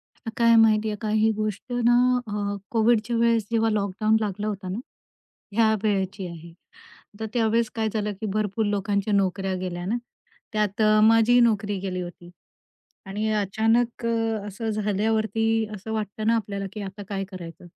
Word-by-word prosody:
आता 230 - -8
काय 230 -1 +5
माहिती 220 -1 +4
आहे 210 - -2
का? 215 - -2
ही 220 +1 +3
गोष्ट 215 +2 -4
ना 240 - +6 0.3
अ, - - -6 0.4
कोविडच्या 230 0 +2
वेळेस 230 -2 +2
जेव्हा 225 -1 +2
लॉकडाऊन 215 +1 +1
लागला 210 0 -2
होता 195 -2 -4
ना, 195 +5 -3 0.8
या 220 -1 +5
वेळेची 195 -2 -1
आहे. 170 0 -10 0.7
तर 220 - -3
त्यावेळेस 230 -1 +2
काय 220 -1 0
झालं, 210 -1 -1
की - - -2
भरपूर 215 +1 0
लोकांच्या 205 0 0
नोकऱ्या 195 -1 +1
गेल्या 175 -1 -4
ना. 220 +6 0 0.6
त्यात 210 0 0
अ, 215 0 +5
माझी 225 +2 +5
नोकरी 205 -3 +2
गेली 185 -1 -3
होती. 175 0 -9 0.8
आणि 210 +3 -2
अचानक 225 +4 +1
अ, 225 -2 -1
असं 220 +3 -4
झाल्यावरती 220 +1 0
असं 210 +2 -7
वाटतं 215 0 -3
ना 230 +1 +4
आपल्याला, 200 -3 -3
की 215 - -6
आता 195 +1 -7
काय 195 -1 -2
करायचं? 175 -1 -9
215 Hz, 160 wpm, -25 LUFS, 200-225 Hz, 0.8 s, ना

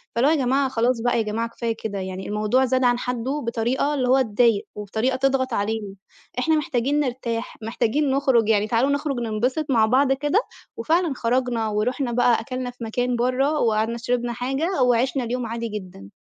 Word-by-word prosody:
فاللي 250 +4 +3
هو - - +3
"يا - - +2
جماعة 270 +1 +1
خلاص 240 -1 +1
بقى 240 0 +1
يا - - +2
جماعة 225 +2 -2
كفاية 230 -1 -3
كده 200 -3 -3
يعني 190 0 -5
الموضوع 215 +5 +1
زاد 260 +1 +1
عن 245 0 +3
حَدُّه 250 +4 -2
بطريقة 245 +5 0
اللي 260 -3 0
هو 265 +1 +4
تضايق 225 -2 +2
وبطريقة 220 +5 -1
تضغط 260 -1 +1
علينا، 205 -1 -2 0.4
إحنا 315 +5 +2
محتاجين 280 0 0
نرتاح، 245 -3 -3
محتاجين 235 +6 0
نُخرج 265 -5 +2
يعني 210 -1 +3
تعالوا 235 +5 +2
نُخرج 285 -2 -1
ننبسط 240 +6 -1
مع 230 -5 +4
بعض 265 +4 +3
كده." 295 +9 +1 0.4
وفعلًا 325 +6 +1
خرجنا 240 -2 0
ورُحنا 240 +5 -1
بقى 245 -1 +3
أكَلنا 255 +1 -4
في 245 -1 -10
مكان 245 +2 -1
برّه 265 +5 +1
وقعدنا 225 +1 +1
شربنا 240 0 -1
حاجة، 270 +7 -1
وعِشنا 250 +2 +2
اليوم 245 +1 -2
عادي 230 +1 -4
جدًا. 185 - -8
245 Hz, 180 wpm, -23 LUFS, 225-265 Hz, 0.4 s, هو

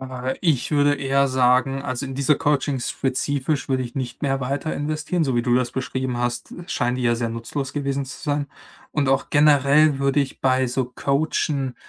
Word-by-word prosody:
Äh, 130 0 -4
ich 155 -8 +1
würde 145 -1 +3
eher 140 0 +1
sagen: 130 +1 +2
„Also 130 0 -3
in 135 - -6
diese 140 +2 +2
Coaching 145 -2 0
spezifisch 140 +3 -1
würde 130 -1 +1
ich 120 - -7
nicht 125 -1 -5
mehr 135 -1 0
weiter 140 +5 -2
investieren.“ 155 +3 -1
So 130 -3 0
wie 120 - +2
du 120 0 +2
das 125 -1 +1
beschrieben 130 -1 -3
hast, 120 0 -3
scheinen 125 -7 -1
die 130 - -3
ja 120 -1 +3
sehr 115 0 -2
nutzlos 130 +4 -4
gewesen 140 -1 -2
zu 135 - -10
sein 145 -2 -1 0.5
und 145 -3 0
auch 135 0 +1
generell 145 0 +5
würde 140 +1 +2
ich 135 - -4
bei 130 -1 +2
so 125 +1 -1
Coachen 140 -2 0
135 Hz, 190 wpm, -23 LUFS, 130-145 Hz, 0.5 s, generell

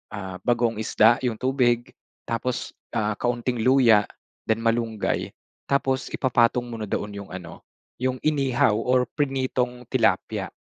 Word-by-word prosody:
ah, 95 -2 -6
bagoong 120 -2 +1
isda 115 +3 +4
yung 115 - -1
tubig 125 -2 +1 0.3
tapos, 120 +2 -3 0.3
ah, 105 0 +1
kaunting 120 0 -1
luya 120 -5 +5 0.4
then 110 - +3
malunggay 115 -2 0 0.4
tapos 135 -1 0
ipapatong 120 -1 +2
mo 115 -2 -7
na 105 - -5
doon 105 +1 -3
yung 100 -1 -8
ano, 95 - -9 0.4
yung 130 0 0
inihaw 135 -7 +2
or 125 +2 +2
prinitong 130 -3 -1
tilapia. 115 -7 +1
120 Hz, 130 wpm, -24 LUFS, 110-130 Hz, 0.4 s, luya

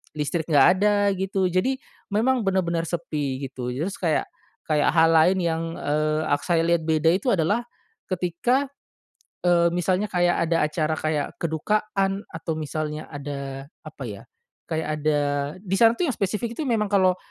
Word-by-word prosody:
listrik, 150 +2 -2
nggak 145 -4 +6
ada 205 0 +3
gitu, 190 0 -1
jadi 220 +10 +1 0.3
memang 240 +5 +2
bener-bener 175 -3 +1
sepi 145 -5 -3
gitu 125 -2 -6
terus 170 +9 -3
kayak 165 -4 +1 0.4
kayak 150 -2 +2
hal 165 0 +6
lain 170 +4 +5
yang, 165 -1 0 0.2
eee, 155 +1 0
ak 145 0 +1
saya 170 -2 +2
lihat 170 0 +2
beda 160 0 +3
itu 195 +7 0
adalah, 200 +4 +2 0.5
ketika, 185 +9 0 0.8
eee, 175 -1 +4
misalnya 185 +3 +1
kayak 175 -3 +1
ada 165 0 +2
acara 155 0 -1
kayak 155 -2 -1 0.2
kedukaan 195 +4 0
atau 165 0 -4
misalnya 155 0 -4
ada 140 -2 -6 0.2
apa 150 -3 -9
ya, 100 -3 -7 0.5
kayak 160 -1 -2
ada 150 -1 +2 0.4
disana 225 +5 +4
tuh 355 - +1
yang - - -2
spesifik 210 +4 -2
itu 315 - -4
memang 220 -3 +1
kalau 185 -3 +3
170 Hz, 155 wpm, -24 LUFS, 155-195 Hz, 0.8 s, nggak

